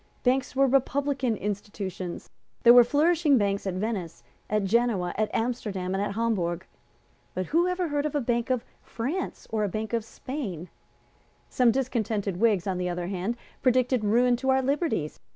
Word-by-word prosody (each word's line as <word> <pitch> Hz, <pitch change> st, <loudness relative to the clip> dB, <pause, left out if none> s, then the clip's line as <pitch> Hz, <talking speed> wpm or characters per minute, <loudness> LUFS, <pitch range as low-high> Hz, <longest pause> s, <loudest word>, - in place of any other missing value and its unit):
Banks 260 Hz, +1 st, +1 dB
were 275 Hz, +1 st, +5 dB
republican 270 Hz, -2 st, +1 dB
institutions. 200 Hz, -3 st, -5 dB, 0.4 s
There 235 Hz, -1 st, +9 dB
were 245 Hz, 0 st, +9 dB
flourishing 300 Hz, +2 st, +3 dB
banks 200 Hz, -2 st, 0 dB
at 185 Hz, -, -2 dB
Venice, 185 Hz, -5 st, -3 dB, 0.3 s
at 210 Hz, -1 st, +1 dB
Genoa, 205 Hz, -3 st, +1 dB
at 215 Hz, 0 st, 0 dB
Amsterdam 210 Hz, -6 st, -2 dB
and 195 Hz, -, 0 dB
at 200 Hz, -1 st, -2 dB
Hamburg. 190 Hz, -6 st, -1 dB, 0.7 s
But 185 Hz, -, -1 dB
who 340 Hz, -, +2 dB
had 365 Hz, -, +1 dB
ever 360 Hz, -2 st, -2 dB
heard 290 Hz, 0 st, 0 dB
of 300 Hz, -, -6 dB
a -, -, +3 dB
Bank 235 Hz, -2 st, -1 dB
of 255 Hz, -3 st, 0 dB, 0.2 s
France 290 Hz, +11 st, -4 dB
or 220 Hz, -1 st, 0 dB
a 205 Hz, -, 0 dB
Bank 215 Hz, +4 st, -4 dB
of 230 Hz, -2 st, +1 dB
Spain? 220 Hz, -, -6 dB, 0.8 s
Some 250 Hz, -2 st, +4 dB
discontented 220 Hz, -6 st, -1 dB
Whigs, 210 Hz, -4 st, +2 dB
on 190 Hz, -2 st, -1 dB
the 180 Hz, 0 st, -1 dB
other 175 Hz, 0 st, -3 dB
hand, 195 Hz, +5 st, -2 dB, 0.2 s
predicted 255 Hz, -2 st, +2 dB
ruin 245 Hz, +4 st, +3 dB
to 265 Hz, +2 st, -2 dB
our 265 Hz, 0 st, +3 dB
liberties. 275 Hz, -, -1 dB
230 Hz, 170 wpm, -27 LUFS, 195-260 Hz, 0.8 s, There